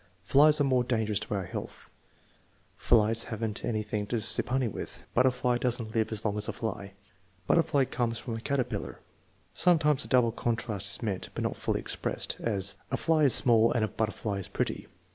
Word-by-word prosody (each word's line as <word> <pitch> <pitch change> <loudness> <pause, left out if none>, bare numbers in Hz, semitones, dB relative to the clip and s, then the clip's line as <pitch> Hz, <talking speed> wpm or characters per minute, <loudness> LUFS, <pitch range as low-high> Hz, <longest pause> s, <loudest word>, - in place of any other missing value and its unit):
"Flies 150 +2 +5
are - - +4
more 130 -3 +2
dangerous 110 -4 0
to - - -4
our 95 - -2
health." - - -8 0.8
"Flies 115 -1 +2
have 110 0 -6
n't 105 0 -5
any 110 -2 -1
thing 105 0 -3
to 120 +2 -1
sip 110 +2 +2
honey 130 -1 +1
with." 105 - -7
"Butterfly 125 -1 +2
does 125 -1 0
n't 110 -2 -7
live 110 -1 0
as 110 0 -1
long 105 -1 0
as 105 - 0
a - - -3
fly." 100 -3 -5 0.5
"Butterfly 155 - +2
comes 115 -2 -2
from 120 0 -6
a 115 - -6
caterpillar." 140 -1 -3 0.5
Sometimes 155 -5 +3
a - - -9
double 125 -3 +3
contrast 115 -4 -2
is 100 - -3
meant, 100 -4 -3
but - - -3
not - - -2
fully - - -2
expressed; - - -3
as, 100 -4 +1 0.2
"A 130 - -1
fly 155 0 +2
is 135 - +6
small 115 -2 +4
and 115 -3 +1
a - - -3
butterfly 110 -2 -3
is 95 - -7
pretty." - - -3
115 Hz, 200 wpm, -29 LUFS, 105-130 Hz, 0.8 s, is